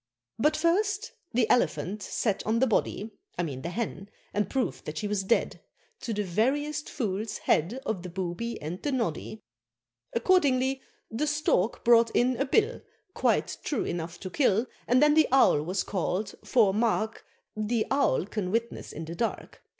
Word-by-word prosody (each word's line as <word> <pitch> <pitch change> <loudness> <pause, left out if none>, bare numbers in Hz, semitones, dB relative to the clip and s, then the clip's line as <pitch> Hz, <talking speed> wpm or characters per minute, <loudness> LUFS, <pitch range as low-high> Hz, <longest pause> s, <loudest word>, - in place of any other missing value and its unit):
But 300 +6 +3
first 390 +5 +1 0.2
the 235 -2 +2
Elephant 210 -4 +1
sat 205 0 -1
on 220 +1 +2
the 260 - +4
body 220 -2 0 0.3
I 175 - 0
mean 135 -6 -4
the 170 - -4
Hen 200 -1 -4 0.2
and 205 -2 0
proved 265 -2 -2
that 150 0 -5
she 210 - -2
was 205 -1 -1
dead, 210 +5 +1 0.4
To 235 - -4
the 210 -1 -1
veriest 275 - 0
fool's 215 -4 -2
head 190 +12 +1
Of 195 -5 -2
the 180 - -7
Booby 185 +6 -4
and 165 +5 -5
the 290 - -1
Noddy. 220 - -3 0.7
Accordingly, 265 -2 +2 0.3
the 250 +7 -1
Stork 295 -9 +1
brought 230 -1 +6
in 250 +1 +3
a 275 - +1
bill 435 - +2 0.3
Quite - - +1
true 285 - -1
enough 170 0 -4
to 185 - -6
kill, 230 -5 +2 0.2
And 255 +4 +5
then 300 0 +6
the 315 0 +5
Owl 260 - +5
was 180 +5 -1
call'd, 195 +1 -2
for, 215 -6 +3
mark, 220 0 0 0.3
The 215 +1 0
Owl 275 - +2
can 205 -2 -3
witness 230 +3 -2
in 160 +2 -6
the 165 - -6
dark. 230 +6 -3
225 Hz, 170 wpm, -28 LUFS, 190-265 Hz, 0.7 s, brought